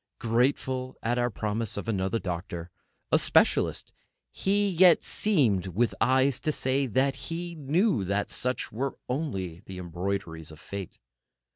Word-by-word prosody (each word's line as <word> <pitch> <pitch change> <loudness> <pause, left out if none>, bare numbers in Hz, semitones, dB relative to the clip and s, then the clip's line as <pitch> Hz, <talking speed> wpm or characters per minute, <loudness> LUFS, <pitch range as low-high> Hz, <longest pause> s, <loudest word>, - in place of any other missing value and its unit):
Grateful 130 +2 0
at 120 +2 +1
our 120 0 +2
promise 110 0 -2
of 100 - -4
another 95 0 0
doctor, 85 -3 -5 0.4
a - - +5
specialist, - - +2 0.4
he 205 +1 +1
yet 180 -2 +6
seemed 120 - +1
with 110 +7 +1
his - - -10
eyes 130 0 +3
to 155 - 0
say 135 -1 +1
that 130 +4 +2
he 170 +1 -4
knew 155 - +1
that 100 +2 0
such 125 0 -2
were 130 +5 -3
only 95 - -3
embroideries 90 -2 -4
of 75 - -12
Fate. 100 0 -7
120 Hz, 140 wpm, -28 LUFS, 95-140 Hz, 0.4 s, yet